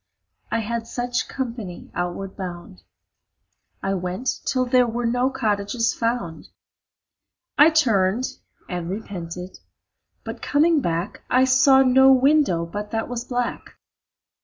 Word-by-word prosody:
I 230 - 0
had 230 +1 -4
such 245 +1 -2
company 230 -9 -6
outward 175 +2 -4
bound. 175 - -8 1.0
I 195 - 0
went 185 +7 -3
till 255 -1 +1
there 250 0 +3
were 235 +1 -2
no 245 +2 +1
cottages 225 -3 0
found. 230 -9 -3 1.1
I 300 +2 +7
turned 230 -7 +1 0.3
and 175 -1 -4
repented, 180 -3 -6 0.6
but - - -7
coming 310 +1 +3
back 170 0 -3
I 255 +1 +4
saw 265 +1 +5
no 265 +1 +6
window 265 - +3
but 205 +5 -6
that 225 +1 -3
was 240 -1 -4
black. 245 -1 -3
230 Hz, 120 wpm, -23 LUFS, 185-255 Hz, 1.1 s, I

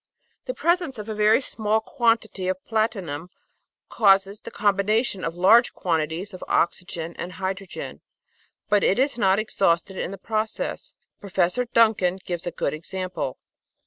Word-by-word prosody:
The - - -4
presence 340 -6 +1
of 210 +1 -7
a - - -2
very 215 +4 +4
small 220 -4 0
quantity 225 -5 0
of 185 0 -3
platinum 195 -8 -2 0.6
causes 195 -1 +3
the - - -8
combination 205 0 +1
of 165 0 -3
large 210 +7 +5
quantities 165 +3 -2
of 185 - -8
oxygen 170 -1 -1
and 180 +1 -5
hydro 190 +2 -4
gen, - - -8 0.7
but 205 -1 +3
it 195 - +3
is 265 -1 +1
not 190 -2 +4
exhausted 190 -3 0
in - - -2
the 195 - -7
process. 215 +2 -3 0.2
Prof. 200 +5 0
Duncan 215 -6 +4
gives 175 -1 -4
a - - -1
good 155 - -2
example. 170 -3 -4
195 Hz, 145 wpm, -24 LUFS, 180-220 Hz, 0.7 s, large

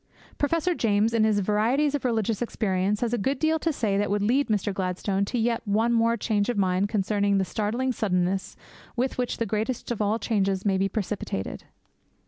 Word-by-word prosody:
Professor 330 +4 +1
James, 220 -5 +1
in 225 -1 +3
his 215 -2 +2
Varieties 230 +9 +1
of 290 - -2
Religious 225 -3 0
Experience, 205 -3 0
has 240 -1 0
a 240 - +1
good 265 +7 0
deal 315 +3 +1
to 325 - 0
say 210 -8 0
that 205 - 0
would 205 0 0
lead 260 +7 +2
Mr. 205 -2 0
Gladstone 190 +1 -1
to 245 - -3
yet 230 0 +1
one 220 +3 +2
more 230 0 +2
change 210 -1 0
of 245 - -1
mind 190 +1 +1
concerning 200 -1 +1
the 190 - +1
startling 225 +7 -1
suddenness 190 -4 -1 0.4
with 255 +1 -1
which 250 - -1
the 230 - -1
greatest 220 +4 -2
of 230 - -2
all 210 +2 +1
changes 195 -4 0
may 195 -2 +2
be 195 +1 +1
precipitated. 200 - -4
215 Hz, 195 wpm, -26 LUFS, 200-240 Hz, 0.4 s, in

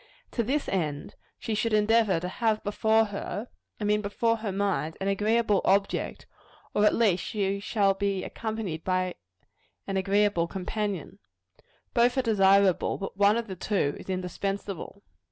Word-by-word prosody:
To 235 - 0
this 275 +6 -1
end, 155 -6 -2 0.2
she 225 - -4
should 220 +1 0
endeavor 215 -3 +3
to 180 - -4
have 215 +3 0
before 220 +2 +2
her 205 +2 -5 0.3
I - - -4
mean 210 0 +2
before 230 +3 0
her 215 -2 -3
mind 190 -5 -1
an 195 - -2
agreeable 210 +1 +2
object; 200 +1 0 0.5
or 210 0 +4
at - - +3
least 195 -7 +2
she 200 -2 -1
should 200 -2 +1
be 200 -2 0
accompanied 215 -8 -4
by 185 -1 0 0.7
an 195 - -2
agreeable 200 -2 +2
companion. 195 0 -4 0.7
Both 245 +2 +3
are 260 - +2
desirable; 195 -4 +3
but 195 - -6
one 205 +2 +4
of 235 - -2
the 190 -4 -6
two 180 -6 0
is - - -11
indispensable. 195 +2 -4
200 Hz, 155 wpm, -27 LUFS, 190-220 Hz, 0.7 s, or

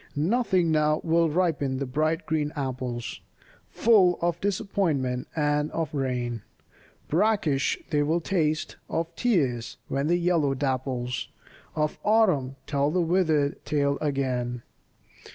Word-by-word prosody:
Nothing 180 - +2
now 155 0 +2
will 165 0 +3
ripen 150 -5 0
the 140 - -2
bright 155 +6 0
green 150 -2 -1
apples, 130 -4 -4 0.5
Full 195 -6 +4
of 170 0 -1
disappointment 175 - -1
and 150 -1 +1
of 160 -3 -2
rain, 125 -4 -2 0.7
Brackish 170 -6 +1
they 150 -2 +2
will 160 +4 +1
taste, 160 -3 -1
of 165 0 -2
tears, 135 - 0
when 140 +2 0
the 175 +2 +3
yellow 170 -6 +1
dapples 130 -2 -2 0.5
Of 150 0 -1
Autumn 185 -12 +3
tell 140 0 +1
the 180 +4 0
withered 160 -4 +1
tale 140 -1 0
again. 125 -4 -1
150 Hz, 120 wpm, -26 LUFS, 135-170 Hz, 0.7 s, Full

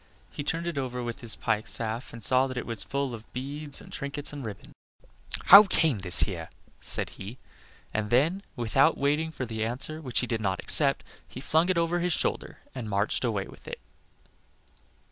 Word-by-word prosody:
He - - -5
turned 165 +3 -2
it 170 -5 -2
over 125 -2 -4
with 120 +3 -5
his 115 -2 -2
pike 110 -1 -1
staff 115 +2 -3
and 115 -2 -11
saw 130 +3 +3
that 130 -1 -6
it 125 - -3
was 115 -3 -1
full 140 -2 -2
of 115 -1 -10
beads 140 +3 -4
and - - -14
trinkets 140 +1 -5
and 145 -2 -6
ribbons. 105 -3 -8 0.7
"How 200 +3 +10
came 160 - +1
this 90 -1 +5
here?" 85 -5 -2 0.3
said - - -1
he. 105 +6 -7 0.6
And 110 -1 -2
then, 155 - +2
without 135 +6 +2
waiting 150 +3 +1
for 135 -5 -5
the 110 -2 -3
answer 135 +7 -2
which 125 -5 -1
he - - -1
did 115 -2 -2
not 95 -3 -1
expect, 140 -2 +5 0.2
he - - -9
flung 160 +6 +1
it 185 - +2
over 170 +1 +1
his 175 0 +1
shoulder - - -2
and 125 -5 -6
marched 100 +4 0
away 105 -5 -1
with - - -15
it. - - -6
130 Hz, 195 wpm, -27 LUFS, 110-150 Hz, 0.7 s, How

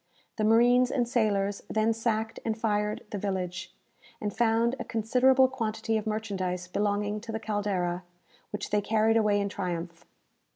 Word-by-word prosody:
The 215 - 0
marines 240 +3 +5
and 245 -3 0
sailors 205 -4 +1
then 220 +1 +2
sacked 225 0 -2
and 225 -1 -1
fired 210 -1 -1
the 205 - -3
village, 190 -2 -3 0.5
and 205 -2 -3
found 230 +1 +2
a - - -2
considerable 255 +4 +3
quantity 225 -3 -2
of 220 0 -1
merchandise 190 -4 -2
belonging 205 +2 -1
to 225 - -7
the 220 - -3
"Caldera," 200 -5 -1 0.5
which 210 0 -5
they 210 0 +2
carried 220 +1 +2
away 210 -2 +3
in 200 - 0
triumph. 175 -4 -4
215 Hz, 155 wpm, -28 LUFS, 200-225 Hz, 0.5 s, marines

